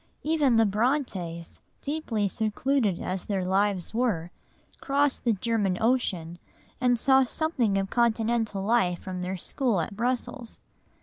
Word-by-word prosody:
Even 295 -5 +2
the 225 0 +5
Brontës, 200 - -1 0.2
deeply 275 -9 -1
secluded 220 0 0
as 185 0 -3
their 195 -3 -1
lives 195 0 0
were, 210 -8 0 0.5
crossed 280 -1 +1
the 235 - +4
German 205 -3 0
Ocean, 185 -9 0 0.4
and 245 -1 +3
saw 265 +3 +5
something 255 -7 0
of 195 0 -2
Continental 225 -3 +1
life 195 -5 +2
from 185 0 -6
their 185 +1 -3
school 235 +2 -1
at 165 +4 -3
Brussels. 245 +1 -3
220 Hz, 130 wpm, -27 LUFS, 190-250 Hz, 0.5 s, the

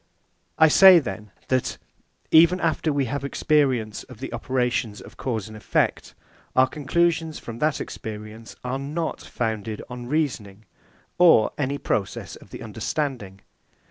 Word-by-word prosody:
I 160 - +7
say 190 +3 +8
then, 110 -8 -3 0.2
that, 130 -1 0 0.5
even 170 +3 +6
after 160 -2 0
we 140 -2 0
have 140 +3 -3
experience 135 -6 +1
of - - -14
the - - -6
operations 125 -4 -1
of - - -13
cause 110 -6 -3
and 110 - -11
effect, 110 - -1 0.4
our 130 - +6
conclusions 160 +3 0
from 115 0 -8
that 155 -1 +1
experience 110 +1 -8
are 125 +2 -3
not 155 +4 -3
founded 110 -2 -4
on 125 -1 -7
reasoning, 115 -9 -2 0.5
or 165 -11 +6
any 140 -1 -2
process 100 -7 -3
of - - -16
the - - -9
understanding. 120 -11 -4
130 Hz, 140 wpm, -24 LUFS, 110-155 Hz, 0.5 s, say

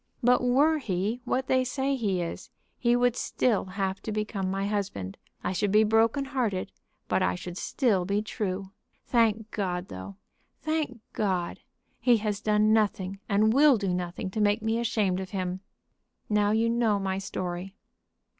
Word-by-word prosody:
But 250 +1 +5
were 285 +6 +3
he 210 +1 -2
what 260 +1 0
they 260 0 +2
say 270 +2 -1
he 195 -8 0
is, 170 - -6 0.3
he 240 0 +3
would 245 -1 +3
still 240 -3 0
have 190 0 -3
to 220 - -4
become 210 -3 -2
my 195 +1 -1
husband. 195 - -3 0.3
I - - -1
should 200 +2 0
be 215 +1 +6
broken 225 +5 +3
hearted, 235 -9 -2 0.4
but - - +1
I 90 - +2
should 175 - -7
still 205 -2 +1
be 200 +3 0
true. 195 -3 -3 0.3
Thank 225 -2 +2
God, 180 -3 -2
though, 95 +1 -8 0.4
thank 310 -7 -2
God, 185 -4 -1 0.4
he 245 -2 +4
has 210 -1 -2
done 215 0 +3
nothing 195 -3 0
and 215 +2 +3
will 280 -1 +6
do 195 -3 -1
nothing 180 +1 -3
to 215 - -2
make 210 +2 +2
me 225 +1 +1
ashamed 210 -5 +1
of 190 -1 -5
him. 185 -1 -3 0.7
Now 210 -1 +3
you 220 +2 +2
know 230 -3 +2
my 195 -1 -2
story." 185 0 -5
210 Hz, 165 wpm, -28 LUFS, 190-235 Hz, 0.7 s, be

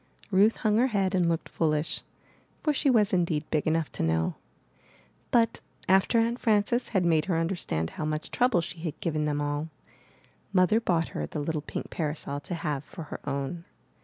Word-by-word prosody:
Ruth 205 +4 +4
hung 215 -1 +2
her 250 +3 +4
head 195 -5 0
and 180 -3 +3
looked 165 0 -1
foolish, 155 -1 0 0.6
for 300 - +2
she 285 0 +2
was 215 -6 +4
indeed 170 -4 +1
big 155 0 +1
enough 160 -1 +1
to - - -5
know. 80 0 +1 1.0
But 230 -1 +2 0.3
after 190 +5 +4
Aunt 230 +2 +2
Frances 220 +2 +2
had 190 -5 +1
made 160 -2 +3
her 180 -4 0
understand 165 - -1
how 155 - -4
much 155 0 -3
trouble 245 -8 +3
she 165 - -7
had 160 -3 -5
given 155 -2 -1
them 145 -1 0
all, 145 +2 -2 0.8
Mother 185 +3 +4
bought 170 -7 +1
her - - -4
the - - -6
little 155 +1 -2
pink - - -6
parasol 150 -3 -3
to 145 +5 -5
have 150 -3 -2
for 165 - -9
her - - -5
own. 140 +5 -3
165 Hz, 185 wpm, -28 LUFS, 150-205 Hz, 1.0 s, Ruth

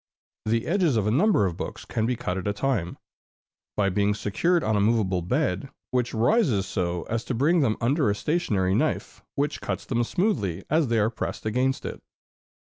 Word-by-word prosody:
The 115 +1 +1
edges 170 - +2
of 105 - +1
a 105 - +2
number 165 - +3
of 90 -3 -2
books - - -6
can 110 0 -1
be 125 - 0
cut 90 -5 -3
at 95 +1 -4
a 100 - +1
time, 105 -6 -1 0.8
by 100 -2 +3
being 100 +2 +1
secured 165 - +1
on 110 - +1
a - - +2
movable 100 -4 +2
bed, 125 - -1 0.2
which 125 -2 0
rises 120 - +2
so 90 -2 -2
as 115 +1 -3
to 125 - -2
bring 155 +8 +3
them 115 -7 +2
under 135 +1 +2
a 100 - +1
stationary 105 - 0
knife, - - -1
which 145 +1 -1
cuts - - -3
them 120 -2 0
smoothly 115 - -1
as 155 -2 +3
they 115 -1 +1
are 110 +1 +2
pressed 115 - -5
against 125 +4 0
it. - - -6
115 Hz, 195 wpm, -26 LUFS, 100-140 Hz, 0.8 s, number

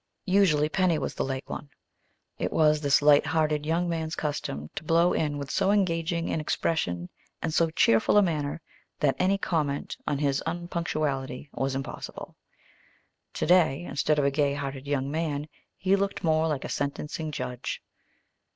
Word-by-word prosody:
Usually, 185 -6 +4
Penny 180 0 +2
was 140 - -3
the - - -2
late 135 0 -3
one. 145 - -6 0.7
It - - -1
was 155 -1 +3
this 145 -1 +3
light 150 +1 +6
hearted 155 -2 +1
young 170 +2 +1
man's 160 -1 -2
custom 75 - -3
to - - -6
blow 170 +2 +3
in 150 -2 0
with 140 0 -5
so 190 - +2
engaging 170 -4 +1
an 160 - -1
expression 90 - -1 0.3
and 160 - -2
so 165 0 +3
cheerful 115 - +3
a 205 - +7
manner 155 -3 -1 0.4
that 140 -3 +2
any 195 +2 +3
comment 150 -7 -1
on 145 - +1
his 140 -1 +1
unpunctuality 155 -6 -3
was 135 0 -1
impossible. 135 0 -6 1.0
Today, 170 -3 +3
instead 150 -2 0
of 145 - +2
a 140 - +3
gay 140 0 +1
hearted 140 -1 -5
young 140 -1 -1
man, 150 -2 -2 0.3
he 190 +2 +3
looked 200 0 -2
more 160 -1 +3
like 150 -4 -2
a - - -5
sentencing 150 +2 -3
judge. 125 -3 -4
150 Hz, 160 wpm, -27 LUFS, 140-165 Hz, 1.0 s, a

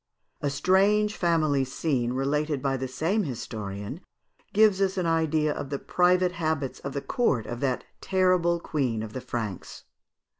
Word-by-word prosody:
A 145 - 0
strange 195 +8 +3
family 155 -5 +2
scene, 130 -2 -1
related 145 +2 0
by 135 0 0
the 130 0 -3
same 160 - 0
historian, 110 - -5 0.5
gives 210 -2 +4
us 195 0 +1
an 180 - 0
idea 160 -2 +1
of 135 - -5
the 140 - -2
private 180 +3 +2
habits 160 -5 -2
of 140 - -6
the 140 - -3
court 140 - +1
of 120 - -5
that 130 -2 -1 0.2
terrible 185 -2 +2
queen 130 -10 -1
of 110 - -7
the 130 - -4
Franks. 110 -7 -5
150 Hz, 155 wpm, -27 LUFS, 130-180 Hz, 0.5 s, gives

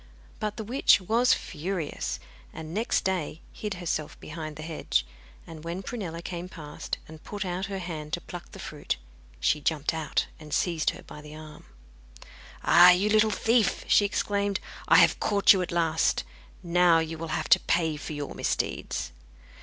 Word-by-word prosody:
But 210 -1 -3
the 220 - -3
witch 245 +3 +4
was 230 +6 +3
furious, 165 -1 -4 0.3
and 160 0 -8
next 220 +4 0
day 180 -4 -2
hid 210 -2 -4
herself 170 -4 -3
behind 155 -1 -7
the 155 - -8
hedge, 155 - -1 0.4
and 160 -2 -10
when 170 +3 -4
Prunella 175 -7 -5
came 175 0 -5
past, 150 -5 -6
and 155 0 -12
put 205 -1 -5
out 185 +2 -2
her 195 -1 -4
hand 160 -5 -6
to 175 - -1
pluck 175 0 -9
the - - -10
fruit, - - -4 0.4
she 150 - +2
jumped 150 +1 0
out 160 -2 -1
and 150 -2 -4
seized 170 -3 +1
her - - -7
by 150 - -11
the 150 0 -11
arm. 155 -1 -11 1.0
'Ah! 175 +1 +8
you 185 +4 +4
little 215 +1 +4
thief!' 225 0 +2
she - - +5
exclaimed. 200 -1 0 0.3
'I - - +6
have - - +6
caught 205 -1 +5
you 190 - 0
at 180 - -3
last. 165 -1 +1 0.4
Now 175 -1 +4
you 160 0 -2
will 165 - -4
have 155 - -3
to - - +7
pay 160 -3 +1
for 150 +1 -6
your 145 -1 -5
misdeeds. - - -2
170 Hz, 175 wpm, -27 LUFS, 155-195 Hz, 1.0 s, Ah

